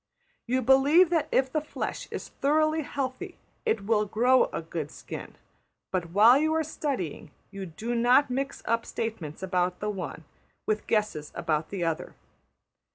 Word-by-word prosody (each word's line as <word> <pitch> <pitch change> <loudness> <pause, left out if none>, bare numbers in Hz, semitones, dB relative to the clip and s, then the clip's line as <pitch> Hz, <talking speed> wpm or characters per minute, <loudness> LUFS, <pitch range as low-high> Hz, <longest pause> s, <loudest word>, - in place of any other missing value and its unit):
You 255 +2 +1
believe 285 +8 +5
that 330 -3 +2
if 265 0 +2
the 310 - +1
flesh 305 - -5
is - - -6
thoroughly 310 +2 +2
healthy 280 +6 -4 0.3
it 210 -3 0
will 210 -1 +2
grow 245 +5 +4
a - - -5
good 160 -2 -4
skin; - - -8 0.6
but, 180 -3 -1
while 220 +9 +6
you 315 +1 +1
are 320 - +2
studying, 275 - -4 0.2
you 195 -1 -6
do 220 +9 -4
not 245 +3 +4
mix 275 +2 -3
up 230 +1 +1
statements 185 -8 -5
about 180 -1 0
the 210 0 -2
one 195 -3 -6 0.4
with 215 0 -1
guesses 210 -9 0
about 155 -1 -1
the 190 -3 -3
other. 165 -2 -2
230 Hz, 160 wpm, -27 LUFS, 185-275 Hz, 0.6 s, while